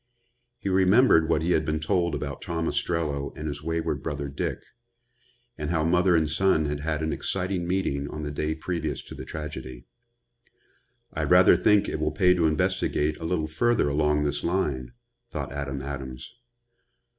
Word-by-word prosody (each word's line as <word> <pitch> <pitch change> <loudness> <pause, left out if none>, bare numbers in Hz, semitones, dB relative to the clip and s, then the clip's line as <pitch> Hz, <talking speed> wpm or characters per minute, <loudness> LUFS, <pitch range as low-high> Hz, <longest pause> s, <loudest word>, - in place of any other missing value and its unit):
He 100 - -6
remembered 95 -2 +5
what 80 -1 +2
he 85 - +1
had 80 - +3
been 75 0 -1
told 85 +1 0
about 70 -1 -5
Tom 80 -1 -2
Ostrello 75 -5 -1
and 75 0 -4
his 75 0 -5
wayward 80 +1 -2
brother 70 -1 -4
Dick, 70 - -3 1.0
and 75 -1 -3
how 80 -2 +1
mother 90 +2 +3
and 80 -2 +3
son 80 0 +2
had 75 0 -2
had 80 +1 -2
an 80 - -1
exciting 90 -2 -2
meeting 70 -7 -1
on 75 - -6
the 75 - -3
day 75 +2 -2
previous 80 -3 -3
to - - -11
the - - -8
tragedy. 65 -5 -7 1.3
"I - - -2
rather - - +6
think 105 -1 +3
it - - -3
will 75 0 +1
pay 90 +4 +4
to 85 -3 +2
investigate 75 0 0
a 80 - -7
little 80 -2 0
further 80 +2 +1
along 75 0 +2
this 75 - -1
line," 70 -9 -1 0.4
thought - - -5
Adam 70 -1 -4
Adams. 65 - -7
80 Hz, 170 wpm, -26 LUFS, 75-85 Hz, 1.3 s, rather